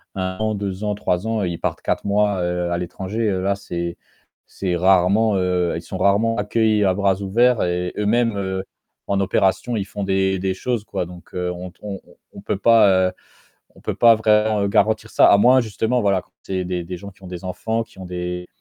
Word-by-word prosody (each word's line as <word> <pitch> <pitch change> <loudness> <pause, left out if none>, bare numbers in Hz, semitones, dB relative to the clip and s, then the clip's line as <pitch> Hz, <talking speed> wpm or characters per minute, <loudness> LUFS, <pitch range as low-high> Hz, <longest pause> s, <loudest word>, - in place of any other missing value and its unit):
an, 95 +3 -2
2 100 0 -4
ans, 105 -1 -1
3 90 0 -1
ans, 110 -2 0
ils 85 -2 -3
partent - - -3
4 - - -2
mois, 100 -1 +1
heu, 90 0 -1
à 85 - 0
l'étranger, 95 +5 -3
là 95 +1 0
c'est 85 -3 -5 0.5
c'est 90 -2 -3
rarement, 95 +4 +3
heu, 90 -2 0
ils 85 - -4
sont 90 +2 -7
rarement 100 +5 +2
accueillis 105 0 +1
à 95 - +3
bras 100 0 +1
ouverts 120 +5 +3
et 90 0 -2
eux-mêmes, 115 +2 +1
heu, 95 -1 -2 0.4
en 100 -1 0
opération, 95 +4 +1
ils 100 - -2
font 100 +1 -6
des 95 0 +1
des 95 0 -1
choses, 120 +3 -2
quoi, 90 - -3
donc 90 0 -13
heu, 90 0 -2
on 90 +1 -7
t - - -32
on 100 -2 -5
on - - -20 0.2
on - - -9
peut - - -2
pas, 100 -4 +5
heu, - - -11 0.6
on - - -17
peut - - -3
pas 115 -1 +6
vraiment 105 -1 +2
garantir 110 +2 +1
ça. - - +6
A 100 - +7
moins 125 +5 +5
justement, 115 +2 -1
voilà, 100 -2 +2
quand - - -32
c'est 95 -1 -3
des 90 -1 -3
des 90 +1 -6
gens 100 +3 -9
qui 95 - -23
ont - - -9
des 90 0 -8
enfants, 110 +5 -2
qui 110 - -22
ont 95 - -7
des 90 0 -5
95 Hz, 215 wpm, -21 LUFS, 90-105 Hz, 0.6 s, A